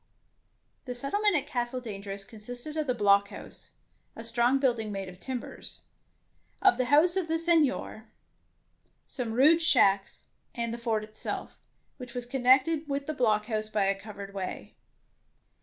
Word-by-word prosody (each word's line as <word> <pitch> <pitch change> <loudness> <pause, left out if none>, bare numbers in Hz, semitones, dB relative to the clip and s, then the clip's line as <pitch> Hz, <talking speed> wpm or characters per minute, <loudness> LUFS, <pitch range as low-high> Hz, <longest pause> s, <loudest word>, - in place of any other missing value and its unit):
The 250 -2 -5
settlement 405 +11 +1
at 285 -2 0
Castle 255 -3 -2
Dangerous 200 -4 -7
consisted 245 +8 -9
of 310 -2 -1
the 250 - +1
blockhouse, 200 -2 0 0.4
a 225 - -8
strong 235 +3 +2
building 235 -6 0
made 195 -1 -4
of 180 0 -13
timbers; 255 +1 -1 0.8
of 385 -8 +4
the 255 - +2
house 305 +7 +4
of 375 -3 0
the 325 0 +1
Seignior; 310 -9 +1 1.0
some 245 -4 -4
rude 295 +8 +5
shacks, 200 -11 +2 0.3
and 235 -2 -2
the 235 - -5
fort 225 -2 -1
itself, 215 0 -6 0.4
which 250 -2 -10
was 245 -1 -4
connected 265 +5 +3
with 280 0 -2
the 310 - -3
blockhouse 215 -3 0
by 210 -2 +1
a 195 - +2
covered 200 -2 -9
way. 190 -2 -6
245 Hz, 145 wpm, -28 LUFS, 215-285 Hz, 1.0 s, rude